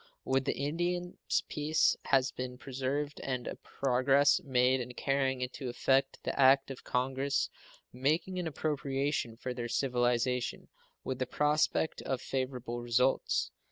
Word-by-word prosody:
With 135 0 +1
the - - -1
Indians 175 +5 -1
peace 150 +1 +2
has 135 -1 +3
been 125 0 -5
preserved 135 +3 -3
and 130 -2 -2
a - - -4
progress 135 +4 +2
made 130 -2 +3
in 125 0 -7
carrying 135 -2 0
into 125 +1 -4
effect 135 +2 +2
the - - -2
act 135 +1 +5
of 130 - -9
Congress 135 +2 0 0.4
making 155 +8 0
an 175 - -2
appropriation 140 -5 -1
for 125 +1 -4
their 120 -1 -4
civilization, 125 -1 0 0.3
with 130 -1 -3
the 130 - -1
prospect 150 +1 +1
of 130 -2 -2
favorable 125 -2 -3
results. 120 +2 +1
135 Hz, 135 wpm, -32 LUFS, 125-140 Hz, 0.4 s, act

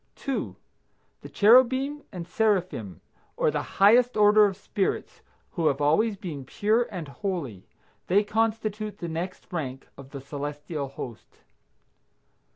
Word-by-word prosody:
2. 275 -2 -3 0.7
The - - -10
cherubim 260 +6 +4
and 175 -4 -7
seraphim, 180 - -1 0.4
or - - +2
the - - -1 0.2
highest 235 +4 +5
order 210 0 +6
of 195 -2 -2
spirits, 200 -1 -3 0.3
who 165 -3 0
have 140 -1 +1
always 195 +9 +2
been 155 -8 -6
pure 215 - +1
and 180 -7 -6
holy. 140 - -5 0.4
They 200 +4 +4
constitute 215 -1 -1
the 170 - -5
next 170 +3 -6
rank 135 -6 -4
of 135 -1 -11
the 140 - -7
celestial 145 +1 -5
host. 130 -3 -10
190 Hz, 130 wpm, -26 LUFS, 145-215 Hz, 0.7 s, order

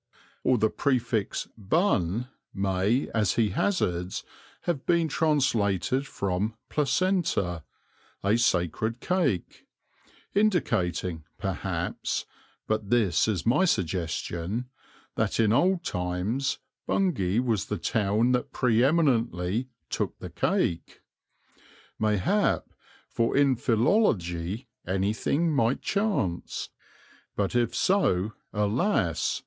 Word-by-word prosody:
Or 130 - +3
the 110 -1 +2
prefix 120 -6 0
'Bun' 115 - +1 0.3
may, 95 +6 +1
as 105 -6 +2
he 110 -3 +2
hazards, 90 - -1 0.4
have 165 -6 -2
been 170 -2 +3
translated 135 - +1
from 100 +2 -2
'placenta,' 145 - +1 0.6
'a 100 +3 +3
sacred 110 +2 +1
cake,' 155 - -1 0.7
indicating, 100 - +1
perhaps - - -2 0.4
but 110 -2 -1
this 105 -8 +3
is 100 -7 -1
my 145 +11 +4
suggestion 90 - -2 0.5
that - - 0
in 110 -1 +4
old 180 +6 +3
times 90 +9 -1 0.3
Bungay 110 - +1
was 115 -7 +1
the - - -2
town 110 +3 +1
that 125 -1 0
pre 120 -2 +2
eminently 120 - +1 0.2
'took - - -2
the - - -8
cake.' 85 - -1 1.0
Mayhap, 110 - +2 0.4
for 115 +2 0
in 140 -2 +4
philology 110 - +1 0.2
anything 110 - 0
might 125 -3 +1
chance; 200 - -1 0.7
but 100 -2 -1
if 120 -2 +1
so, 110 - +2 0.2
alas! 105 - +1
115 Hz, 100 wpm, -27 LUFS, 95-140 Hz, 1.0 s, my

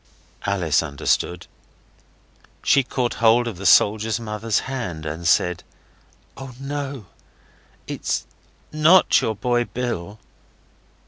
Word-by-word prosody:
Alice 90 -7 +1
understood. 80 +3 -1 1.2
She 140 - +4
caught 125 -1 -2
hold 115 +1 +4
of 110 -6 -5
the 95 +1 -1
soldier's 110 +3 +4
mother's 110 -1 -2
hand 95 -13 -5
and 80 +2 -4
said 90 0 +2 0.7
'Oh, 135 -2 -9
NO 140 -4 -5 0.8
it's - - -3 0.5
NOT 155 +5 +5
your 110 - -1
boy 120 +3 0
Bill! 110 -6 -4
110 Hz, 105 wpm, -22 LUFS, 90-130 Hz, 1.2 s, NOT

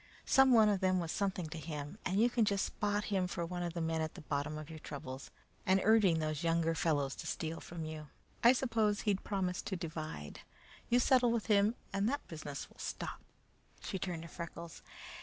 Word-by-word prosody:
Some 270 -1 +6
one 220 -3 +7
of 205 -2 +2
them 185 -1 +2
was 165 -2 -2
something 190 -3 -1
to 165 +1 -6
him, 150 +4 -6
and 190 +1 +1
you 235 - +6
can 240 -1 +2
just 200 -2 +2
spot 205 0 -1
him 185 -2 +2
for 170 -1 -3
one 175 +1 -4
of 175 -1 -2
the 170 - -1
men 160 0 0
at 155 0 -3
the - - -8
bottom 150 +1 -2
of 155 -1 -7
your 160 -1 -8
troubles, 135 -3 -7 0.3
and 190 +1 +4
urging 210 -6 +5
those 155 -1 -2
younger 165 0 +2
fellows 145 -5 +1
to - - -6
steal 160 0 -3
from 165 -2 -6
you. 155 -1 -6 0.4
I 240 +2 +9
suppose 225 -5 +1
he'd 200 -2 0
promised 185 -3 -2
to 190 - -1
divide. 155 - -5 0.5
You 240 - +5
settle 250 -1 +4
with 230 -2 0
him, 210 +1 +4 0.2
and 200 +2 +2
that 285 +2 -3
business 150 -4 -6
will - - -22
stop." - - -4 0.6
She 190 - -3
turned 175 -3 -3
to - - -8
Freckles. 170 -1 -8
175 Hz, 210 wpm, -34 LUFS, 160-205 Hz, 0.6 s, I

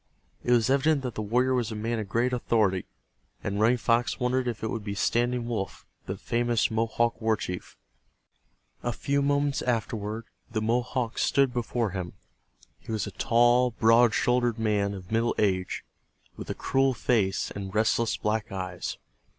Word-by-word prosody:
It - - -4
was 120 +1 +4
evident 140 +1 +3
that 125 -2 -3
the 110 - -4
warrior 125 +5 +2
was 120 -3 0
a - - -4
man 115 +2 -2
of 105 -2 -5
great 120 +4 +1
authority, 105 -6 +1 0.6
and 100 +1 -2
Running 115 +4 +4
Fox 120 +2 +1
wondered 125 0 0
if 115 -3 -3
it - - 0
could 110 -1 -3
be 100 -1 -4
Standing 120 +3 +1
Wolf, 110 -5 -4 0.2
the 95 - -3
famous 120 +1 0
Mohawk 115 +1 0
war 110 -1 +2
chief. 90 -2 -6 1.0
A 120 - -2
few 140 +4 0
moments 140 0 +1
afterward 110 -2 -2 0.3
the 110 - -1
Mohawk 120 +1 -1
stood 135 -3 +2
before 120 -2 -1
him. 90 -2 -5 0.7
He 115 - -9
was 110 -3 -1
a - - -6
tall, 120 +2 +3
broad 115 0 +4
shouldered 120 -2 +2
man 105 -3 0
of 95 0 -10
middle 115 +1 +1
age, 95 -3 0 0.5
with - - -8
a - - -2
cruel 135 -1 +1
face 105 -6 +1
and 100 0 -6
restless 110 +1 +2
black 110 +1 -1
eyes. 90 -2 -4
115 Hz, 165 wpm, -27 LUFS, 105-125 Hz, 1.0 s, was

